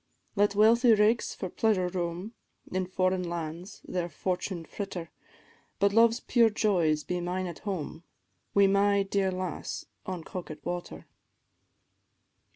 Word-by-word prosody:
"Let 205 Hz, 0 st, +3 dB
wealthy 230 Hz, +2 st, +6 dB
rakes 215 Hz, +3 st, +2 dB
for 190 Hz, -, -4 dB
pleasure 190 Hz, -1 st, +1 dB
roam, 180 Hz, +3 st, -3 dB, 0.4 s
In 185 Hz, 0 st, -1 dB
foreign 185 Hz, 0 st, +1 dB
lands 170 Hz, +1 st, -5 dB
their 175 Hz, -1 st, -2 dB
fortune 180 Hz, +1 st, -3 dB
fritter; 180 Hz, -5 st, -6 dB, 0.7 s
But 200 Hz, +2 st, +2 dB
love's 230 Hz, +1 st, +5 dB
pure 235 Hz, -2 st, +4 dB
joys 175 Hz, -8 st, +1 dB
be 180 Hz, +2 st, -2 dB
mine 180 Hz, +2 st, -2 dB
at 175 Hz, -3 st, -6 dB
home, 180 Hz, -5 st, -5 dB, 0.5 s
Wi' 200 Hz, 0 st, +6 dB
my 200 Hz, +1 st, +3 dB
dear 195 Hz, 0 st, 0 dB
lass 185 Hz, -3 st, -4 dB, 0.2 s
on 185 Hz, -3 st, -4 dB
Coquet 170 Hz, -4 st, -7 dB
water. 175 Hz, 0 st, -5 dB
185 Hz, 130 wpm, -29 LUFS, 175-205 Hz, 0.7 s, wealthy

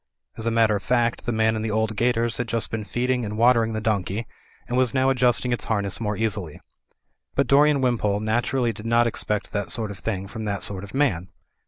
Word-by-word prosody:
As 110 Hz, -, -4 dB
a -, -, +4 dB
matter 115 Hz, -2 st, +3 dB
of 100 Hz, -, -2 dB
fact, 120 Hz, +2 st, 0 dB
the -, -, +1 dB
man 110 Hz, 0 st, +2 dB
in 110 Hz, -, -2 dB
the 110 Hz, -, -2 dB
old 110 Hz, +1 st, 0 dB
gaiters 115 Hz, 0 st, +1 dB
had 120 Hz, -, -2 dB
just 115 Hz, 0 st, -2 dB
been 110 Hz, -1 st, -3 dB
feeding 125 Hz, +5 st, -1 dB
and 105 Hz, 0 st, -4 dB
watering 115 Hz, -1 st, +4 dB
the 110 Hz, -, -2 dB
donkey, 105 Hz, 0 st, -1 dB, 0.4 s
and 120 Hz, -, -2 dB
was 130 Hz, 0 st, +2 dB
now 130 Hz, 0 st, +3 dB
adjusting 125 Hz, -1 st, +2 dB
its 120 Hz, -, -3 dB
harness 100 Hz, -2 st, -1 dB
more 105 Hz, -2 st, -2 dB
easily. 100 Hz, -8 st, -2 dB, 0.8 s
But 140 Hz, -, +2 dB
Dorian 145 Hz, 0 st, +4 dB
Wimpole 110 Hz, -5 st, +1 dB
naturally 120 Hz, +2 st, 0 dB
did 110 Hz, +1 st, -8 dB
not 120 Hz, +1 st, +4 dB
expect 105 Hz, -3 st, -2 dB
that 100 Hz, -1 st, -3 dB
sort 110 Hz, -3 st, -2 dB
of 100 Hz, -, -9 dB
thing 100 Hz, -3 st, -3 dB
from 110 Hz, +2 st, -6 dB
that 100 Hz, -2 st, -2 dB
sort 95 Hz, -1 st, -1 dB
of 100 Hz, +4 st, -9 dB
man. 95 Hz, -, +1 dB
115 Hz, 220 wpm, -24 LUFS, 105-120 Hz, 0.8 s, a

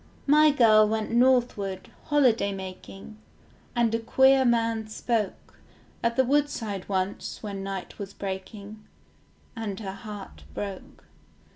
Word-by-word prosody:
My 300 Hz, +2 st, +6 dB
girl 220 Hz, -6 st, +5 dB
went 220 Hz, 0 st, -2 dB
northward, 240 Hz, -6 st, +1 dB
holiday 250 Hz, -9 st, +3 dB
making, 195 Hz, +2 st, -9 dB, 0.6 s
And 235 Hz, -2 st, +2 dB
a 230 Hz, -, +1 dB
queer 265 Hz, +3 st, +4 dB
man 230 Hz, -2 st, +1 dB
spoke 220 Hz, -1 st, -3 dB, 0.4 s
At 235 Hz, 0 st, 0 dB
the 260 Hz, -, +4 dB
woodside 245 Hz, -9 st, -1 dB
once 190 Hz, +3 st, -3 dB
when 200 Hz, -2 st, -5 dB
night 195 Hz, -1 st, -6 dB
was 200 Hz, -1 st, -6 dB
breaking, 200 Hz, +2 st, -7 dB, 0.7 s
And 215 Hz, -4 st, -4 dB
her 195 Hz, -3 st, -5 dB
heart 205 Hz, -1 st, -9 dB
broke. 200 Hz, -2 st, -7 dB
215 Hz, 120 wpm, -26 LUFS, 195-240 Hz, 0.7 s, My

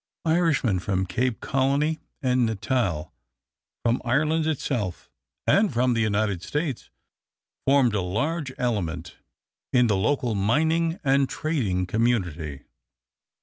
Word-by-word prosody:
Irishmen 160 Hz, -, +2 dB
from 95 Hz, 0 st, -1 dB
Cape 115 Hz, +7 st, -1 dB
Colony 140 Hz, +4 st, +1 dB, 0.2 s
and 125 Hz, -1 st, +2 dB
Natal, 105 Hz, -6 st, -1 dB, 0.7 s
from 120 Hz, +1 st, +2 dB
Ireland 155 Hz, +6 st, +1 dB
itself, 125 Hz, -, -2 dB, 0.3 s
and 200 Hz, -2 st, +4 dB
from 125 Hz, 0 st, +2 dB
the 115 Hz, -, +1 dB
United 105 Hz, -4 st, 0 dB
States 145 Hz, -, -3 dB, 0.8 s
formed 135 Hz, -4 st, +4 dB
a 105 Hz, -, +1 dB
large 135 Hz, -, -2 dB
element 85 Hz, -9 st, -2 dB, 0.5 s
in 125 Hz, -1 st, +4 dB
the 105 Hz, -3 st, +2 dB
local 120 Hz, +4 st, +1 dB
mining 160 Hz, -, +1 dB
and 135 Hz, -1 st, +3 dB
trading 110 Hz, -, -1 dB
community. 85 Hz, -, -1 dB
120 Hz, 110 wpm, -25 LUFS, 100-145 Hz, 0.8 s, and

